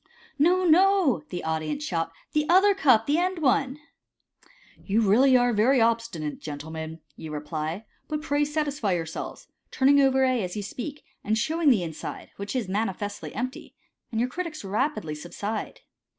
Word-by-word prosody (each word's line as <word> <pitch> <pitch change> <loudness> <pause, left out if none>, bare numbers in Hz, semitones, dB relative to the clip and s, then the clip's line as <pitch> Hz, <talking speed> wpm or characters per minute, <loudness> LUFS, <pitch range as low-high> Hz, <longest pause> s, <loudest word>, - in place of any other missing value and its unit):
" - - -26
No, 360 +5 +4
no," 340 - +4
the 175 - -5
audience 160 - -2
shout, 165 - -2
" - - -36
the 300 0 +1
other 385 +4 +6
cup, 260 - +4
the 295 +3 +2
end 365 +1 0
one." 275 -2 +1 0.5
" - - -28
You 215 +3 +2
are - - +1
really 260 +4 +5 0.2
very 240 +5 +4
obstinate, 225 -10 0
gentlemen," 160 +2 -7
you 160 - -8
reply, 155 +6 -4
" - - -43
but 305 -1 -3
pray 290 0 +1
satisfy 290 -8 -1
yourselves," 165 -2 -5 0.2
turning 280 +1 +4
over 265 -1 +4
A 255 -3 +2
as 180 0 -4
you 205 - -3
speak, 275 +8 -6 0.2
and 220 +1 +1
showing 315 +6 +2
the 220 -9 +4
inside, 160 -2 -7
which 200 +4 -5
is 240 -6 -1
manifestly 205 0 -3
empty, 255 +3 -5 0.3
and 225 - -2
your 245 - +2
critics 335 -4 -5
rapidly 205 - -1
subside. 200 +8 -5
235 Hz, 170 wpm, -26 LUFS, 180-295 Hz, 0.5 s, other